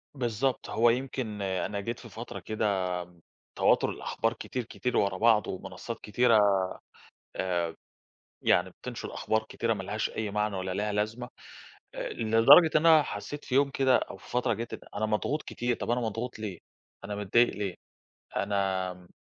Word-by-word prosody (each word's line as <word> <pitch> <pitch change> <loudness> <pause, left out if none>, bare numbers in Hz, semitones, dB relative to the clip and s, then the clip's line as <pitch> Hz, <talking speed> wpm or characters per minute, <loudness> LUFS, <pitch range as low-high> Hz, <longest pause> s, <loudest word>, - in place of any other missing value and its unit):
بالضبط، 125 0 -1
هو 120 +1 +4
يمكن 125 -4 -2
أنا 100 +1 -2
جيت 115 +4 -4
في 115 - -11
فترة 115 +2 -7
كده 110 0 -3 0.4
م 90 0 -19 0.4
تواتر - - +4
الأخبار 115 +1 -2
كتير، 125 +1 -5
كتير 125 +3 -2
ورا 100 -2 +1
بعض 110 -1 +4
ومنصات 95 +5 -6
كتيرة 115 +3 +3 0.8
آآ، 90 -2 -2
آآ، - - -6
ب - - -19 0.7
يعني - - +3
بتنشُر - - -7
أخبار 110 0 0
كتيرة 115 -1 0
ما 100 -3 -5
لهاش 105 +3 -2
أي 110 -2 -3
معنى 105 0 0
ولا 95 0 -3
ليها 105 +2 -1
لازمة 110 +4 -2 0.7
آآ، - - -3
لدرجة 115 +9 +7
إن 155 - +1
أنا 160 -2 +7
حسّيت 145 +8 -6
في 130 - -2
يوم 140 +1 +4
كده 130 -1 +3
أو - - -5
في - - -16
فترة 125 0 +1
جَت 115 +1 -5
إن - - -5 0.2
أنا 105 +1 0
مضغوط 110 +8 -1
كتير، 120 0 -2
طَب - - -2
أنا 120 +1 +1
مضغوط 115 +1 -3
ليه؟ 100 -5 -5 0.5
أنا 105 +1 -4
متضايق 105 +4 +3
ليه؟ 100 -3 -3 0.6
أنا 95 -2 0
م 90 -1 -17
110 Hz, 175 wpm, -29 LUFS, 100-120 Hz, 0.8 s, لدرجة